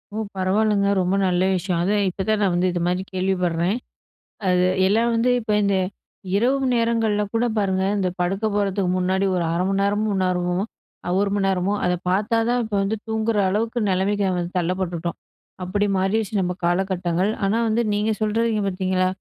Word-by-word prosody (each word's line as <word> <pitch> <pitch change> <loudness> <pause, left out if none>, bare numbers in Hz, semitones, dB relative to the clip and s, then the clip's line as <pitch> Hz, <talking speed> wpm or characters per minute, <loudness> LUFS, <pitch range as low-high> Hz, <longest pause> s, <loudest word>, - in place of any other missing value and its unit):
ஓ! 220 - -1 0.2
பரவால்லங்க, 200 +2 +2
ரொம்ப 180 +2 +1
நல்ல 180 0 +1
விஷயம். 180 -1 -1
அதான் 200 +3 +1
இப்ப 185 - -6
தான் 215 -1 +2
நான் 195 -3 +2
வந்து 180 +1 +2
இது 175 - -2
மாதிரி 180 +1 0
கேள்விப்பட்றேன். 185 0 0 0.7
அது 180 0 +3 0.2
எல்லாம் 225 +4 +2
வந்து 230 +2 +2
இப்ப 220 -2 -4
இந்த 200 -1 +2 0.6
இரவு 260 +6 +2
நேரங்கள்ல 225 -3 +1
கூட 230 +1 +1
பாருங்க, 190 -2 +1
இந்த 190 -2 0
படுக்க 195 +4 -1
போறதுக்கு 200 -2 0
முன்னாடி, 190 +1 +1
ஒரு 175 - 0
1/2 175 +2 0
மணி 195 0 0
நேரமும் 205 0 0
நேரமும், 180 0 0 0.6
1 200 0 +1
மணி 200 -1 +1
நேரமோ, 190 +1 0
அத 180 - +2 0.2
பார்த்தா 205 +5 +1
தான் 245 0 +2
இப்ப 215 -1 -4
வந்து 200 +3 -1
தூங்குற 220 0 0
அளவுக்கு 225 +5 -1
நெலமைக்கு 195 +2 +1
வந்து 175 0 -3
தள்ளப்பட்டுட்டோம். 175 -1 -2 0.5
அப்டி 205 +3 0
மாறிருச்சு 200 +3 0
நம்ம 180 -1 -1
காலகட்டங்கள். 180 +1 0
ஆனா 200 +3 +1
வந்து 225 +2 +1
நீங்க 210 +2 +1
சொல்றீங்க 215 0 +1
பார்த்தீங்களா, 185 -1 0
195 Hz, 165 wpm, -22 LUFS, 180-215 Hz, 0.7 s, அது